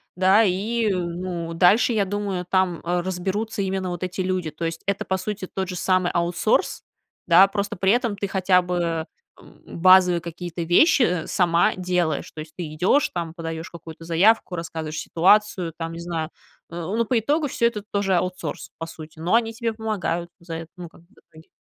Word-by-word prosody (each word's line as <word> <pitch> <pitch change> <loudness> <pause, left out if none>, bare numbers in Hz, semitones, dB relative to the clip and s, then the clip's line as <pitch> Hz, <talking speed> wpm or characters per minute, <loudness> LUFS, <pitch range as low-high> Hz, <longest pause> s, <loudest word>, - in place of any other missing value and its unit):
да. 190 +4 +5
И, 220 +4 0
э, - - 0
ну, 170 -1 -4
дальше, 195 +8 +4
я 210 -3 +2
думаю, 195 -2 -3
там 185 -2 +1
разберутся 190 +5 -2
именно 190 -1 -2
вот 175 +1 -5
эти 180 +1 -5
люди. 185 -3 -2
То 160 +3 -5
есть, 165 0 -4
это, 200 0 -1
по 190 - 0
сути, 190 0 -5
тот 190 -1 -4
же 180 - -4
самый 185 -1 +1
аутсорс, 175 - 0 0.4
да, 185 +3 +7
просто 200 +1 -3
при 190 +2 +3
этом 235 -4 0
ты 200 0 -2
хотя 185 -1 +3
бы, 170 -2 -2 0.3
м, - - -18
базовые 180 0 +5
какие-то 170 +1 -6
вещи 180 - +3
сама 175 -2 +2
делаешь. 180 -3 -1
То 155 - -7
есть, 155 0 -11
ты 160 -4 -5
идёшь 185 - +2
там, 170 -2 -4
подаёшь 165 -1 -6
какую-то 165 -1 -11
заявку, 180 +3 +3
рассказываешь 160 -2 -5
ситуацию 185 -1 +2
там, 165 0 -4
не 165 - -7
знаю, 165 -2 -3 0.4
э. 170 - -9
Ну, 195 +7 -1
по 245 - +1
итогу, 290 +7 +1
всё 235 - 0
это 235 -3 0
тоже 200 -2 +1
аутсорс, 180 +1 -3
по 165 - -5
сути, 160 -1 -11
но 175 +6 +1
они 225 -1 +1
тебе 230 0 -2
помогают 210 -6 -3
за 170 -1 -7
это. 165 0 -7
Ну, 175 -2 -9
как - - -19
бы 170 - -26
в - - -21
итоге. 160 +1 -17
180 Hz, 190 wpm, -23 LUFS, 170-200 Hz, 0.4 s, да